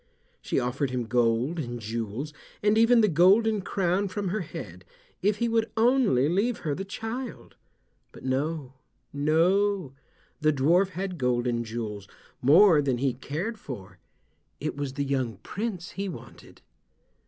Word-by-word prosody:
She - - 0
offered 125 +3 -1
him 125 -1 -2
gold 120 +7 +1
and 120 -4 -4
jewels, 115 +6 -4 0.3
and 210 +1 +4
even 230 +1 +5
the 215 - +4
golden 200 +5 +4
crown 190 +1 0
from 195 0 -3
her 215 +4 -1
head, 90 - -8 0.4
if 205 +2 +2
he 235 - 0
would 225 -1 +1
only 225 - +4
leave 200 +9 0
her 150 - 0
the 190 - -4
child. 225 +6 -6 0.6
But - - -14
no—no—the 135 +1 -2 1.8
dwarf 165 +8 +3
had 185 -1 -5
gold 125 -1 +1
and 120 -1 0
jewels, 110 -3 -5 0.3
more 160 +4 +6
than 135 -3 0
he 130 0 0
cared 165 - -4
for. 100 - -9 0.6
It - - -3
was 140 -2 -4
the 140 +1 -2
young 130 -6 -1
Prince 195 -4 -4
he 195 0 -4
wanted. 170 - -12
155 Hz, 140 wpm, -27 LUFS, 125-200 Hz, 1.8 s, more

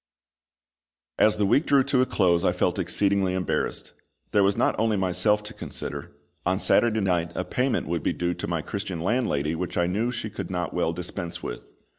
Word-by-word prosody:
As 110 - +4
the 105 - +2
week 140 +10 +3
drew 140 -2 +5
to 135 -1 +2
a 130 - +2
close 85 -2 +2
I - - +3
felt - - 0
exceedingly 100 -2 +1
embarrassed. 95 -1 -2 0.4
There 105 - +4
was 100 0 +2
not - - +3
only 110 -1 +2
myself 95 +3 +1
to 105 +2 -8
consider; 70 -4 -6 0.3
on 90 +1 +1
Saturday 110 +2 +3
night 90 -3 0
a - - -2
payment 130 +1 0
would 85 0 -1
be - - 0
due 90 0 -1
to - - -5
my 85 -2 -2
Christian 95 -4 -4
landlady 85 - 0
which 90 +2 -4
I 85 - +3
knew 105 +7 0
she 110 -3 -5
could 100 -3 -6
not 90 -3 -3
well 80 - +1
dispense 85 0 -6
with. - - -6
95 Hz, 195 wpm, -26 LUFS, 85-105 Hz, 0.4 s, drew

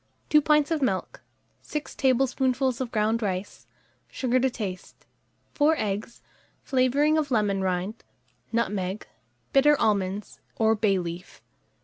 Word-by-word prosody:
2 300 - +6
pints 300 +1 +3
of 320 -2 0
milk, 195 -8 -2 0.4
6 300 -1 -5
tablespoonfuls 260 -1 +1
of 245 -2 -3
ground 220 +1 +1
rice, 190 -1 -4 0.4
sugar 255 -1 0
to 260 +1 +2
taste, 200 -7 -7 0.5
4 310 +2 +3
eggs, 210 +1 -4 0.4
flavouring 280 +4 +2
of 295 -2 -2
lemon 205 -5 +1
rind, 190 +3 -2 0.5
nutmeg, 200 -3 -2 0.5
bitter 295 +1 +5
almonds 200 -1 -1 0.2
or 220 0 +3
bay 210 -2 +2
leaf. 175 +1 -7
230 Hz, 120 wpm, -26 LUFS, 200-270 Hz, 0.5 s, 2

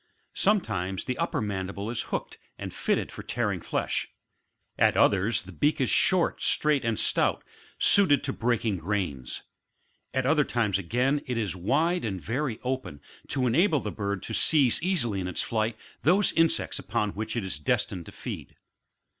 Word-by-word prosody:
Sometimes 100 - 0
the 125 - -2
upper - - -1
mandible 100 +1 -3
is 120 - -2
hooked - - -4 0.2
and - - -6
fitted - - -1
for - - -8
tearing - - -2
flesh, - - -2 0.7
at - - +4
others 105 +3 +3
the 95 - -11
beak 145 - +1
is 130 - +1
short, 185 -3 +3
straight 150 -3 +2
and 115 -2 0
stout, - - +1 0.3
suited 185 -9 +6
to 135 - -1
breaking 115 -4 0
grains; 80 -8 -3 0.7
at 130 -1 -1
other 150 +2 +4
times 105 -7 0
again 125 +10 0
it 125 -2 -2
is 105 -4 -2
wide 155 - +1
and 100 -5 -3
very 125 - -2
open, 130 - -3 0.3
to 130 -2 0
enable 155 - +3
the 105 - -4
bird 100 -2 -3
to 110 - -5
seize 135 -1 +4
easily 155 - 0
in 90 - -3
its 90 - -2
flight, 110 0 -1 0.2
those 190 +6 +4
insects 165 0 +1
upon 105 -1 -1
which 110 +3 -4
it 115 - -1
is 75 -6 -4
destined 85 +3 -1
to - - -9
feed. - - -7
115 Hz, 165 wpm, -27 LUFS, 100-145 Hz, 0.7 s, suited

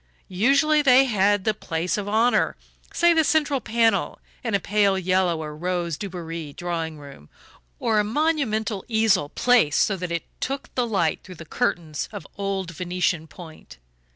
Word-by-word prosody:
Usually 280 - +3
they 270 -1 +6
had 205 -4 +2
the 215 - +1
place 170 -4 -2
of 205 -1 -4
honour 225 +4 +2 0.3
say 345 0 +4
the 320 -1 +3
central 290 -3 +1
panel 225 -3 +1 0.3
in 230 -4 0
a - - +2
pale 200 0 +2
yellow 185 -3 +1
or 150 -1 -7
rose 175 0 -2
Dubarry 165 -5 -6
drawing 165 -2 -4
room, 140 - -13 0.5
or 220 -2 +1
a - - +3
monumental 220 - -1
easel 220 -10 +2
placed 235 -11 +3
so 200 - -1
that 180 -1 -5
it 170 -1 -2 0.2
took 275 +1 -4
the 245 -2 0
light 180 -8 0
through 185 - -11
curtains 165 - -3
of - - -8
old 195 -3 -3
Venetian 175 -1 -2
point. 160 -1 -13
195 Hz, 155 wpm, -24 LUFS, 170-230 Hz, 0.5 s, they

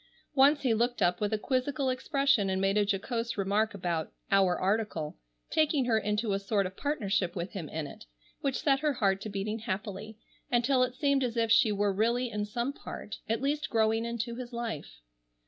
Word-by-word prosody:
Once 285 +1 +5
he 250 -4 +3
looked 240 +2 +1
up 175 +3 +2
with 205 0 0
a 215 - +1
quizzical 260 +3 0
expression 275 -5 +2
and 190 0 0
made 195 +1 +2
a 210 - +4
jocose 230 +4 -2
remark 205 +2 +1
about 170 -4 -2 0.2
"our 190 -2 +4
article," 195 -6 -1 0.4
taking 305 -4 +2
her 235 -2 +2
into 210 0 0
a 195 - 0
sort 200 0 0
of 185 +1 -5
partnership 200 - -1
with 175 0 -4
him 170 -7 -6
in 160 -1 -3
it, 100 - -11 0.3
which 275 -2 -1
set 275 -3 +3
her 300 0 +1
heart 195 -5 +1
to 215 - -5
beating 205 +2 -3
happily, 210 0 -5 0.3
until 250 +2 +3
it 250 0 +1
seemed 280 -1 +2
as 240 -2 -2
if 225 -1 +2
she 225 -1 +5
were 205 -1 +1
really 235 +4 +1
in 210 0 -2
some 235 +6 -2
part 220 -5 -7
at 225 +3 0
least 290 +1 0
growing 225 0 +2
into 235 0 -3
his 245 +1 -7
life. 225 - -5
220 Hz, 200 wpm, -30 LUFS, 195-255 Hz, 0.4 s, Once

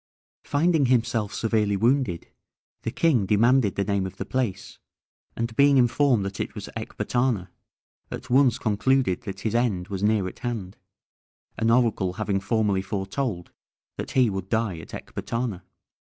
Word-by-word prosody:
Finding 155 -1 +2
himself 120 -4 +1
severely 105 -3 0
wounded, 115 -5 +1 0.5
the - - -3
king 130 - +2
demanded 115 +1 +3
the 100 - 0
name 100 -1 0
of 95 - -11
the - - -4
place, 115 -7 -3 0.6
and 115 0 -3
being 140 +1 +5
informed 125 -3 +3
that 100 -1 -5
it - - -4
was - - -7
Ecbatana, 120 -8 -1 0.6
at - - -7
once 130 -1 +4
concluded 115 0 +1
that 100 -2 -6
his 110 0 -1
end 110 -7 0
was 95 -2 -4
near 105 -2 +2
at - - -9
hand, 115 -7 -4 0.8
an 115 - +2
oracle 115 -6 +2
having 105 -1 -1
formerly 100 -1 +1
foretold 95 0 -3 0.5
that - - -5
he 130 -2 +4
would 95 -2 -4
die 110 -7 0
at - - -11
Ecbatana. 115 -6 -4
110 Hz, 150 wpm, -25 LUFS, 100-125 Hz, 0.8 s, being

